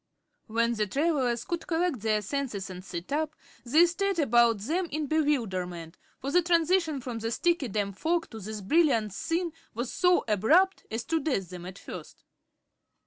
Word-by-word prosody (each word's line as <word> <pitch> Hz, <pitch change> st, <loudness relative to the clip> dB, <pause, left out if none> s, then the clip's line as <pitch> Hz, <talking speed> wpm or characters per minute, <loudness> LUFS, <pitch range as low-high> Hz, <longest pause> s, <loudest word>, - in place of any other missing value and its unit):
When 230 Hz, +1 st, +1 dB
the 215 Hz, -2 st, 0 dB
travelers 270 Hz, -, 0 dB
could 340 Hz, -1 st, -4 dB
collect 330 Hz, -5 st, 0 dB
their 215 Hz, 0 st, +1 dB
senses 210 Hz, -6 st, -3 dB
and 180 Hz, 0 st, -8 dB
sit 175 Hz, +1 st, -7 dB
up 310 Hz, +1 st, -1 dB, 0.3 s
they 305 Hz, +8 st, +5 dB
stared 390 Hz, +2 st, -1 dB
about 235 Hz, -6 st, +4 dB
them 340 Hz, -, -1 dB
in 305 Hz, +1 st, -2 dB
bewilderment, 190 Hz, -, -1 dB, 0.2 s
for 275 Hz, -, -4 dB
the 355 Hz, -, +5 dB
transition 335 Hz, -2 st, +2 dB
from 240 Hz, -2 st, -5 dB
the 225 Hz, 0 st, -2 dB
sticky, 335 Hz, +3 st, +1 dB
damp 200 Hz, -2 st, -3 dB
fog 335 Hz, +1 st, 0 dB
to 225 Hz, -, -7 dB
this 215 Hz, +1 st, -6 dB
brilliant 230 Hz, -, +2 dB
scene 335 Hz, -, -2 dB, 0.2 s
was 240 Hz, +2 st, -3 dB
so 360 Hz, -1 st, +3 dB
abrupt 310 Hz, -, +3 dB
as 225 Hz, +1 st, -3 dB
to 325 Hz, -, 0 dB
daze 255 Hz, -, -1 dB
them 180 Hz, -1 st, -7 dB
at 190 Hz, +1 st, -9 dB
first. -, -, -10 dB
260 Hz, 170 wpm, -28 LUFS, 215-330 Hz, 0.3 s, they